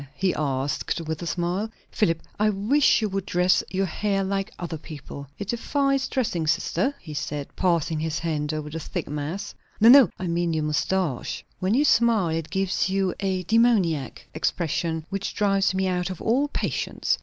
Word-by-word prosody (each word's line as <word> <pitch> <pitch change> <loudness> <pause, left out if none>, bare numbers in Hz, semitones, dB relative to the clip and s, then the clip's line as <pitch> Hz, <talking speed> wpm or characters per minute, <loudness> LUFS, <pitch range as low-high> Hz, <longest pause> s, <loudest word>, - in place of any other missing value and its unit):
he 190 -2 +1
asked, 140 0 -1
with 160 -1 -4
a 170 - -4
smile. 180 +6 -1 0.2
"Philip, 165 -6 +1 0.2
I 210 0 +4
wish 220 +6 +3
you 215 - +1
would 195 0 -2
dress 180 +1 +3
your 195 +1 0
hair 195 +2 -1
like 195 +1 -1
other 165 -3 -5
people." 145 -2 -9
"It 200 -1 -6
defies 275 +3 +1
dressing, 180 -11 -1
sister," 185 - +1
he 155 -3 -9
said, 145 0 -4
passing 165 -3 +1
his 160 -1 -2
hand 155 -3 -2
over 155 -1 -4
the 165 - -4
thick - - -4
mass. 150 +7 -4 0.3
"No, 225 +2 +7
no, 270 -1 +9
I 185 - -4
mean 170 -1 0
your 155 - 0
moustache. 150 -1 -1
When 190 +4 +1
you 290 +3 +4
smile, 230 - +4
it 160 0 -2
gives 190 0 0
you 190 -1 +1
a 190 -2 -1
demoniac 195 - +2
expression, 160 0 -1
which 195 0 -3
drives 195 -1 +2
me 190 0 +1
out 180 0 -1
of 185 - -6
all 260 +6 +2
patience. - - -1
185 Hz, 180 wpm, -25 LUFS, 160-205 Hz, 0.3 s, no